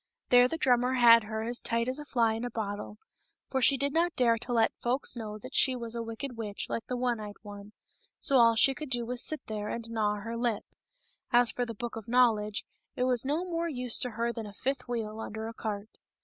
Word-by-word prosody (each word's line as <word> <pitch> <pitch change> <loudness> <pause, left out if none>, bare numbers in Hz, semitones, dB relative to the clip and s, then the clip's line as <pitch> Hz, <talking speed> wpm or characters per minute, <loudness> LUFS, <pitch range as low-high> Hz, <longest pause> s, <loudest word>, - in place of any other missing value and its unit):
There 245 0 +7
the 325 - -4
drummer 250 -3 +2
had 230 -2 +7
her 220 +1 -4
as 240 +2 +1
tight 230 0 0
as 260 +3 -1
a 295 - -7
fly 230 -5 +1
in 225 +2 -4
a 245 - -2
bottle, 210 -2 -5 0.5
for 265 - 0
she 275 +2 +6
did 280 +2 0
not 340 +1 +1
dare 235 -2 +3
to 240 - -6
let 230 -2 +2
folks 250 +3 0
know 215 -3 -6
that 255 +5 -11
she 260 -1 +4
was 235 -2 -5
a 235 - -3
wicked 230 +3 -6
witch 210 -3 -4
like 230 - -4
the 250 - -3
one 245 -2 0
eyed 210 -1 -7
one; 205 0 -10 0.5
so 275 - +2
all 230 -1 +6
she 270 +5 +5
could 300 +2 -7
do 240 -2 -1
was 245 0 -4
to - - +1
sit 310 - -2
there 210 -1 -4
and 230 -1 -5
gnaw 210 -2 0
her 230 +2 -5
lip. 230 -3 -1 0.7
As 240 -2 +5
for 245 -1 -2
the 230 - -6
Book 240 +2 -5
of 225 - -8
Knowledge, 225 -4 +2 0.3
it 250 - -1
was 250 -1 +1
no 305 +6 0
more 335 -1 -2
use 250 -5 +1
to 250 - 0
her 235 +1 -2
than 225 -3 -6
a 205 - -10
fifth 260 +3 -3
wheel 225 -3 -4
under 220 0 -5
a 225 - -7
cart. 215 -1 -6
235 Hz, 245 wpm, -29 LUFS, 220-250 Hz, 0.7 s, There